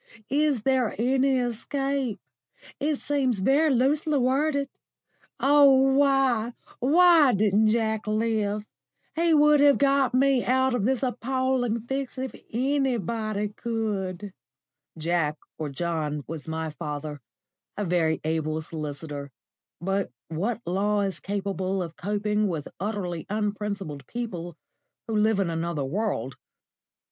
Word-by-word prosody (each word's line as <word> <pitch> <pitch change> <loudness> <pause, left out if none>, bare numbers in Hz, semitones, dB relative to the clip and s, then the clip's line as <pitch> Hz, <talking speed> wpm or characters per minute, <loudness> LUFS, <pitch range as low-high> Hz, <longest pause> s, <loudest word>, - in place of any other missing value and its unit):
Is 285 -5 +2
there 260 -3 +1
any 260 +3 +2
escape? 260 0 -2 0.6
It 300 +1 +1
seems 270 -5 0
very 275 +11 +3
loosely 290 +4 +2
worded. 280 +2 +1 0.7
Oh 285 0 +6 0.2
why, 270 -4 +2 0.3
why 320 0 +6
didn't 210 +1 +3
Jack 220 -1 0
live? 215 -1 0 0.5
He 330 0 +3
would 300 0 +5
have 285 -1 +6
got 275 -2 +2
me 270 -1 +3
out 260 +1 +2
of 230 -5 0
this 260 +1 +1
appalling 255 -1 0
fix 265 +3 -4
if 260 0 -4 0.2
anybody 230 -5 -1
could." 205 -4 -3 0.6
Jack, 160 -2 0 0.2
or 155 -2 -3
John, 150 -1 -2
was 160 -1 -7
my 160 0 -3
father 150 -2 -6 0.6
a 205 - -1
very 165 -3 +1
able 155 0 -1
solicitor; 150 -2 -6 0.5
but 195 -2 -1 0.2
what 205 +9 -2
law 205 +4 +1
is 195 -2 -2
capable 195 -1 -2
of 165 -1 -8
coping 210 +2 0
with 160 -6 -3
utterly 185 -4 -3
unprincipled 200 -8 -3
people 175 -9 -5 0.5
who 225 - -2
live 215 -1 +3
in 185 -4 0
another 165 -3 -2
world? 135 - -2
215 Hz, 120 wpm, -26 LUFS, 175-265 Hz, 0.7 s, Oh